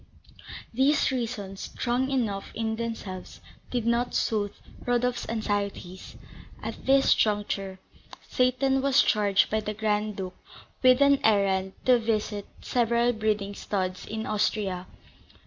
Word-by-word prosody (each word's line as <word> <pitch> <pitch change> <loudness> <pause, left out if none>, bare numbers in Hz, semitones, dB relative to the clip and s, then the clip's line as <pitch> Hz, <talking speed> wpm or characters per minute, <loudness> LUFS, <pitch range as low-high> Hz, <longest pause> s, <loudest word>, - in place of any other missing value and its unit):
These 270 +5 +3
reasons, 225 -6 -4
strong 255 +2 -1
enough 225 -7 -1
in 220 0 -1
themselves, 220 -5 -6 0.3
did 245 -3 -2
not 235 +1 +1
soothe 205 -2 0 0.3
Rodolph's 245 0 0
anxieties. 205 -4 -3 0.5
At - - -6
this 270 0 +5
juncture, 205 -2 -1 0.5
Seyton 255 +1 +2
was 275 0 +4
charged 205 -2 +2
by 220 - +2
the 210 0 -4
Grand 210 -1 0
Duke 185 -1 -5 0.5
with 255 +1 +5
an 280 -1 +5
errand 195 -3 +2
to 250 -1 +5
visit 215 -2 -2
several 235 0 +2
breeding 210 -2 -1
studs 185 -2 -3
in 220 0 -4
Austria. 205 -3 -1
220 Hz, 120 wpm, -27 LUFS, 200-245 Hz, 0.5 s, this